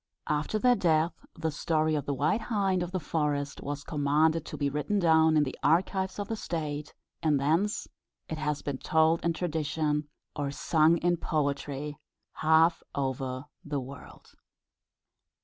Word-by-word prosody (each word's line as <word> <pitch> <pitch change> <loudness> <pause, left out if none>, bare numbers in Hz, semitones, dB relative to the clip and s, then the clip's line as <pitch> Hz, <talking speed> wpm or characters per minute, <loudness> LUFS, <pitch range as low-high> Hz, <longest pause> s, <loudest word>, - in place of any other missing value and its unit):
After 150 +8 0
their 250 +3 +4
death 165 -4 +2 0.2
the 160 -1 -2
story 155 +1 +1
of 150 -2 -1
the 140 - 0
White 150 - +1
Hind 195 -5 0
of 175 0 -3
the 185 - -1
Forest 145 -3 -1
was 145 0 -4
commanded 155 +2 +1
to - - -6
be 145 - 0
written 150 +9 -1
down 160 -3 +4
in 150 - +5
the 135 - -4
archives 190 +3 +1
of 205 - -3
the 225 - -2
state, 150 -7 -4 0.3
and 150 -3 +2
thence 165 +9 +1 0.4
it 160 - -5
has 150 -1 -2
been 140 -2 -3
told 160 +1 +2
in 170 - +2
tradition, 150 -3 -1 0.3
or 145 -2 -2
sung 155 +3 +3
in 175 +1 +1
poetry, 145 -2 -2 0.4
half 160 +2 +4
over 130 -1 -2 0.2
the 145 -2 -2
world. 135 +1 -11
155 Hz, 155 wpm, -29 LUFS, 145-170 Hz, 0.4 s, in